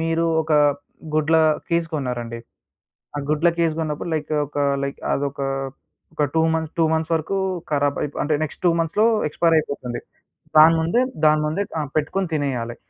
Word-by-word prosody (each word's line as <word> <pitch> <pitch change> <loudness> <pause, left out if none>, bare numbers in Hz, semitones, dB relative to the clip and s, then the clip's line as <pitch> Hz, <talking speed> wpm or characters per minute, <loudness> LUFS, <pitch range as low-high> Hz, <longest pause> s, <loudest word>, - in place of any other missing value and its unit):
మీరూ 165 +1 0 0.2
ఒకా 155 -1 +2 0.6
గుడ్ల 155 +1 +3 0.3
కేస్ 170 0 +1
కొన్నారండి, 120 -5 -3 0.8
ఆ - - -1
గుడ్ల 155 +3 +3
కేస్ 165 -2 +2
గొన్నప్పుడు, 155 +1 -3
లైకు 155 0 -2
ఒక, 145 - -14 0.3
లైక్ 140 - -5
అదొకా, 140 -1 -2 0.7
ఒక - - 0
2 160 - +3
మంత్ 160 -1 -2
2 165 - +4
మంత్స్ 160 +1 -1
వరకూ 165 +5 -1 0.3
కరాబైపో 145 0 -1
అంటే, 150 +1 +1
నెక్స్ట్ 155 - -9
2 - - +6
మంత్స్‌లో 170 +7 +2 0.2
ఎక్స్‌పైర్ 165 +2 +2
అయిపోతుంది. 135 -5 -4 0.6
దాని 160 +2 +8
ముందే 170 +9 +2 0.3
దాని 155 0 +4
ముందే 170 +7 -1 0.2
ఆహ్, 150 -3 -2
పెట్టుకొని 185 +5 0
తినేయాలి. 125 -5 -2
155 Hz, 155 wpm, -22 LUFS, 145-165 Hz, 0.8 s, దాని